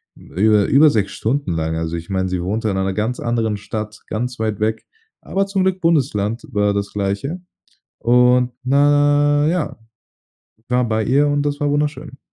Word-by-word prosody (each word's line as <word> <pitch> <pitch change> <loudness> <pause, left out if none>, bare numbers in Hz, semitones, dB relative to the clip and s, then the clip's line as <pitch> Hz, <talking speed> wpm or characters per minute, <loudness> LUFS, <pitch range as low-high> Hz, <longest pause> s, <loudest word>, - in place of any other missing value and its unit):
hm, - - -17
über 105 +2 +3
über 150 +3 +6
6 105 -7 0
Stunden 135 +1 -2
lang. 80 -1 -2
Also 80 +1 -3
ich 85 +2 -9
meine, 95 -1 -1
sie 90 -1 -2
wohnte 105 +5 -2
in 95 - -1
einer 95 0 -1
ganz 110 +5 -2
anderen 115 -3 -1
Stadt, 105 +1 -6
ganz 120 +2 -4
weit 110 -2 -2
weg, 110 +1 -1 0.3
aber 195 +1 -1
zum 195 -1 -1
Glück 190 0 0
Bundesland 125 -9 0
war 105 0 +1
das 100 0 -3
Gleiche. 105 - -3 0.6
Und, 125 +1 +4
na 145 +1 +3
ja, 165 -6 -1 0.9
war 125 -1 +1
bei 110 0 0
ihr 140 +3 +3
und 145 0 +1
das 145 0 -2
war 145 -1 0
wunderschön. 145 -1 -2
120 Hz, 175 wpm, -19 LUFS, 105-145 Hz, 0.9 s, über